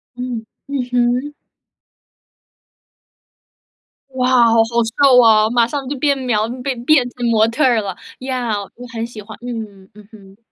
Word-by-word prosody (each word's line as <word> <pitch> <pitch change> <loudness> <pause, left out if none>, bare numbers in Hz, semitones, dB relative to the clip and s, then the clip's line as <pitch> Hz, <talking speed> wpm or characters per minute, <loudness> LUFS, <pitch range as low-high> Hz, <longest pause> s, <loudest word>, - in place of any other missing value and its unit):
嗯。 245 -2 -5 0.2
嗯 280 -2 -2
哼。 250 +4 0 2.8
哇， 255 -1 -1 0.2
好 225 - +2
好 225 - +6 0.4
瘦 265 -3 +7
啊， 215 -2 +5
马 235 0 +3
上 275 +2 -5
就 285 +1 -4
变 280 +1 +1
苗 230 -5 0 0.2
变 255 -3 -3
变 270 -4 +4
成 245 0 -5
模 220 -1 +3
特 230 +7 -1
儿 240 -4 +3
啦， 195 -3 -5 0.2
呀， 250 -5 -2
我 245 +1 -10
很 225 0 -3
喜 230 -2 -10
欢， 215 +1 -11
嗯 215 -6 -7
嗯 210 -1 -15
哼。 195 -3 -16
240 Hz, 160 characters per minute, -18 LUFS, 220-255 Hz, 2.8 s, 瘦